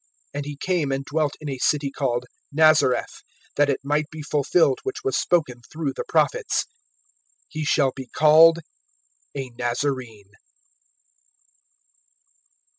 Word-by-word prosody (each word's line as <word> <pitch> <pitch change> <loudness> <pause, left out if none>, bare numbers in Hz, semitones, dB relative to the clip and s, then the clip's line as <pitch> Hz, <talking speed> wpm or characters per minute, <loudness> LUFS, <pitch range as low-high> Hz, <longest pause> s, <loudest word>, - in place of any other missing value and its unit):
(23)And 145 0 -3
he 145 -1 -7
came 170 -4 -1
and 135 0 -2
dwelt 150 -1 -1
in 155 - -8
a 135 -2 -4
city 140 +1 +1
called 125 -3 -2 0.3
Nazareth; 155 -4 +3 0.3
that 145 0 +3
it 140 - -1
might 150 +1 0
be 155 -1 -8
fulfilled 145 0 +2
which 410 +1 -5
was 410 - -1
spoken 140 -9 0
through 155 -4 -3
the - - -4
prophets: - - +1 0.8
He 155 - -5
shall 140 -3 +2
be 130 -2 -8
called 160 +5 +6 0.8
a 130 -2 -5
Nazarene. 120 -4 -3
145 Hz, 125 wpm, -23 LUFS, 135-155 Hz, 0.8 s, called